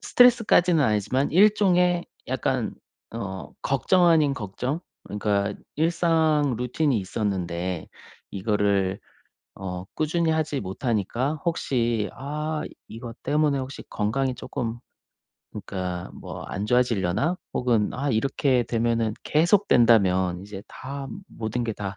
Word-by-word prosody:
스트레스까지는 215 Hz, -9 st, +5 dB
아니지만 110 Hz, +3 st, +1 dB
일종의 180 Hz, -2 st, +4 dB, 0.2 s
약간 -, -, -1 dB, 0.4 s
어 95 Hz, -4 st, -5 dB
걱정 175 Hz, +6 st, +3 dB
아닌 155 Hz, -4 st, +4 dB
걱정? 125 Hz, -, -3 dB, 0.2 s
그러니까 100 Hz, -1 st, -1 dB, 0.2 s
일상 160 Hz, -4 st, +2 dB
루틴이 125 Hz, 0 st, +1 dB
있었는데 90 Hz, -4 st, -2 dB, 0.5 s
이거를 100 Hz, -1 st, +1 dB, 0.6 s
어 90 Hz, -2 st, -5 dB
꾸준히 160 Hz, +1 st, +1 dB
하지 155 Hz, -3 st, 0 dB
못하니까 115 Hz, +7 st, -1 dB
혹시 120 Hz, -, 0 dB
'아 150 Hz, +3 st, -3 dB, 0.3 s
이것 115 Hz, +1 st, -9 dB
때문에 150 Hz, 0 st, +2 dB
혹시 130 Hz, +1 st, -6 dB
건강이 125 Hz, +5 st, -1 dB
쪼끔 120 Hz, -3 st, -4 dB, 0.7 s
그러니까 90 Hz, -2 st, -5 dB
뭐 -, -, -8 dB
안 100 Hz, +2 st, -4 dB
좋아지려나?' 125 Hz, -, +1 dB, 0.2 s
혹은 115 Hz, -4 st, +1 dB
'아 140 Hz, +2 st, -1 dB
이렇게 130 Hz, +2 st, +1 dB
되면은 115 Hz, -1 st, 0 dB
계속 175 Hz, +7 st, +3 dB
된다면 95 Hz, -7 st, +4 dB
이제 100 Hz, -1 st, -8 dB
다 140 Hz, +1 st, -7 dB, 0.2 s
모든 115 Hz, +2 st, -3 dB
게 115 Hz, -, -1 dB
다 100 Hz, -2 st, -5 dB
120 Hz, 260 characters per minute, -25 LUFS, 105-150 Hz, 0.7 s, 스트레스까지는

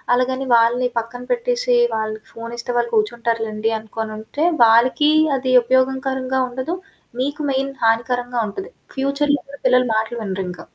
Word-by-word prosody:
అలాగని 260 Hz, +1 st, -1 dB
వాళ్ళని 235 Hz, +2 st, +3 dB
పక్కన 240 Hz, +2 st, -7 dB
పెట్టేసి -, -, +1 dB, 0.2 s
వాళ్ళకి 215 Hz, 0 st, -4 dB
ఫోను 230 Hz, +1 st, -7 dB
ఇస్తే 245 Hz, +1 st, -4 dB
వాళ్ళు 235 Hz, 0 st, 0 dB
కూర్చుంటారు 230 Hz, +1 st, 0 dB
లెండి. 215 Hz, +1 st, -2 dB
అనుకోనుంటే 220 Hz, +6 st, -4 dB, 0.2 s
వాళ్ళకి 250 Hz, +6 st, +4 dB, 0.3 s
అది 255 Hz, 0 st, -1 dB
ఉపయోగకరంగా 265 Hz, +1 st, 0 dB
ఉండదు. 260 Hz, +7 st, -4 dB, 0.5 s
మీకు 285 Hz, +3 st, -2 dB
మెయిన్ 270 Hz, +1 st, -1 dB
హానికరంగా 240 Hz, +2 st, +1 dB
ఉంటది. 385 Hz, -, -7 dB, 0.3 s
ఫ్యూచర్‌లొ 280 Hz, +2 st, +1 dB
కూడా 280 Hz, 0 st, -12 dB
పిల్లలు 250 Hz, 0 st, +4 dB
మాటలు 225 Hz, +2 st, -1 dB
వినరింక. 190 Hz, -2 st, -4 dB
245 Hz, 135 wpm, -20 LUFS, 225-265 Hz, 0.5 s, వాళ్ళకి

